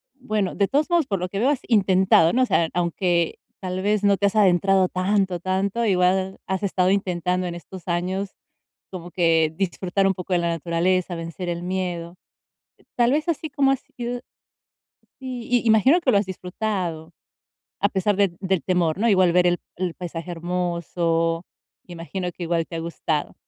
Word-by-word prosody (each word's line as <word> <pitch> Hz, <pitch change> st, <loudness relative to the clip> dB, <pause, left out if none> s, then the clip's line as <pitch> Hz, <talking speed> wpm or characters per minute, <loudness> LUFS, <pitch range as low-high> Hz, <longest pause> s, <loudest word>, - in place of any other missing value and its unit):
bueno, 215 Hz, -8 st, -2 dB
de 200 Hz, -1 st, +2 dB
todos 295 Hz, +4 st, +1 dB
modos 340 Hz, -5 st, +2 dB
por 195 Hz, -, 0 dB
lo 180 Hz, 0 st, -3 dB
que 195 Hz, -, -4 dB
veo, 260 Hz, +5 st, +3 dB
has 290 Hz, -, 0 dB
intentado, 190 Hz, -6 st, +4 dB
¿no? 255 Hz, +1 st, +3 dB
O -, -, +4 dB
sea, 165 Hz, -8 st, +1 dB
aunque 175 Hz, -1 st, 0 dB, 0.2 s
tal 185 Hz, 0 st, -4 dB
vez 210 Hz, +1 st, +1 dB
no 200 Hz, -1 st, +4 dB
te 200 Hz, +2 st, +2 dB
has 200 Hz, -, -3 dB
adentrado 190 Hz, -1 st, +4 dB
tanto, 185 Hz, -1 st, 0 dB
tanto, 195 Hz, +5 st, -1 dB
igual 190 Hz, 0 st, +2 dB
has 190 Hz, 0 st, -2 dB
estado 185 Hz, -1 st, +2 dB
intentando 180 Hz, -2 st, 0 dB
en 170 Hz, -, -5 dB
estos 180 Hz, +1 st, -11 dB
años, 185 Hz, +3 st, -1 dB, 0.6 s
como 175 Hz, -2 st, -8 dB
que 165 Hz, -3 st, +2 dB
disfrutar 195 Hz, +1 st, 0 dB
un 190 Hz, -, +2 dB
poco 180 Hz, +1 st, -7 dB
de -, -, +3 dB
la 170 Hz, 0 st, 0 dB
naturaleza, 170 Hz, +2 st, 0 dB
vencer 165 Hz, +2 st, -6 dB
el 170 Hz, 0 st, -3 dB
miedo. 180 Hz, -2 st, -3 dB, 0.8 s
Tal 240 Hz, 0 st, +3 dB
vez, 305 Hz, +2 st, 0 dB
así 315 Hz, -1 st, -2 dB
como 275 Hz, -1 st, +2 dB
ha 270 Hz, -, +2 dB
sido 245 Hz, -1 st, -6 dB, 1.0 s
sí, 250 Hz, -2 st, -2 dB
imagino 230 Hz, -, +5 dB
que 265 Hz, -, +2 dB
lo 200 Hz, -, +4 dB
has 200 Hz, -, -1 dB
disfrutado, 180 Hz, -3 st, -4 dB, 0.7 s
a 200 Hz, -, +2 dB
pesar 195 Hz, +1 st, 0 dB
del 195 Hz, -4 st, +1 dB
del 190 Hz, -2 st, 0 dB
temor, 175 Hz, -3 st, +1 dB
¿no? 230 Hz, -, +2 dB
Igual 185 Hz, -3 st, +4 dB
ver 180 Hz, 0 st, +4 dB
el 175 Hz, 0 st, +1 dB, 0.2 s
el 180 Hz, -2 st, -2 dB
paisaje 175 Hz, 0 st, -6 dB
hermoso, 170 Hz, -1 st, -1 dB, 0.4 s
imagino 175 Hz, +1 st, -5 dB
que 175 Hz, -, -8 dB
igual 165 Hz, -1 st, 0 dB
te 165 Hz, -, -8 dB
ha -, -, -2 dB
gustado. 165 Hz, -2 st, -3 dB
185 Hz, 180 wpm, -23 LUFS, 175-200 Hz, 1.0 s, imagino